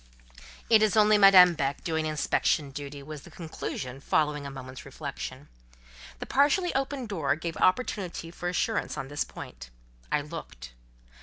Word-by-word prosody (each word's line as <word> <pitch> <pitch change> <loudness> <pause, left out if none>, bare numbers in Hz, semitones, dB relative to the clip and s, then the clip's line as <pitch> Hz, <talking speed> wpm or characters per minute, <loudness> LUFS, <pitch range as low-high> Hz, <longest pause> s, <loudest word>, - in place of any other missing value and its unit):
"It 220 -2 +6
is 215 -1 +2
only 210 0 +5
Madame 185 -3 +8
Beck 140 -3 -2
doing 160 -2 -1
inspection 150 -1 0
duty," 140 0 -7
was 150 0 -8
the - - -14
conclusion 135 -5 -6
following 150 -1 0
a - - -5
moment's 130 -1 -9
reflection. - - -7 0.7
The - - -6
partially 300 +6 +2
opened 270 -2 -2
door 155 -9 0
gave 165 +1 -5
opportunity 185 -5 0
for 175 +1 -4
assurance 180 0 -1
on 135 -2 -5
this 145 0 -1
point. - - -10 0.4
I 150 - +2
looked. 145 - -9
160 Hz, 150 wpm, -28 LUFS, 140-200 Hz, 0.7 s, Madame